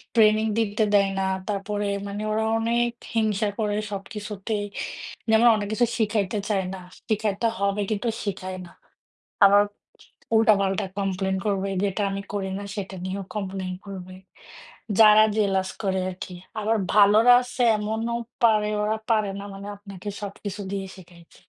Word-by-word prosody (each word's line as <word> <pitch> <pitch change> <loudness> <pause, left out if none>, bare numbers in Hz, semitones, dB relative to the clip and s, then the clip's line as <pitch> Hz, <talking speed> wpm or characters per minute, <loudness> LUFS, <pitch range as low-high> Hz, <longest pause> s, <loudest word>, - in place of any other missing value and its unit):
training 220 0 +5
দিতে 215 0 +1
দেয় 200 -1 +5
না, - - +1 0.2
তারপরে 205 0 -2 0.2
মানে 200 +1 -5
ওরা 220 +1 +1 0.2
অনেক 235 +1 +1 0.3
হিংসা 215 -1 +1
করে 210 -1 0 0.2
সবকিছুতেই। 205 +1 -4 0.7
যেমন 225 +2 +6
অনেক 205 -1 -2
কিছু 240 +2 +3
শিখাইতে 210 -2 0
চায় 195 -3 +1
না, 190 - -6 0.3
শিখাইতে 215 +1 +1
হবে 200 +1 +1
কিন্তু 215 +3 -1 0.2
শিখায় 185 -2 -4
না। - - -13 0.8
আবার 200 +1 +7 0.7
উল্টাপাল্টা 200 -4 +3
কমপ্লেন 190 -1 -1
করবে, 195 -1 0
যেটা 200 +1 0
আমি 195 0 -3
করি 200 -2 -2
না - - -6
সেটা 195 -2 -5
নিয়েও 195 +1 -3
কমপ্লেন 190 -2 -3
করবে, 185 -2 -8 0.9
যারা 215 -1 +8
জেলাস 195 -2 +1
করে 190 -1 +1
আরকি। 185 0 -7 0.3
আবার 220 +2 +1 0.2
ভালরা 210 +4 +7
আছে 250 0 -5 0.2
এমনও 220 +3 -2 0.3
পারে 215 -2 +4 0.2
ওরা 215 +1 0
পারে 215 -2 +2
না 200 - -6
মানে 195 +1 -8
আপনাকে 200 -1 -11
সবকিছু 205 0 -6
দিয়ে 195 -1 -3
শিখাইতে। 175 -2 -16
205 Hz, 140 wpm, -25 LUFS, 195-215 Hz, 0.9 s, যারা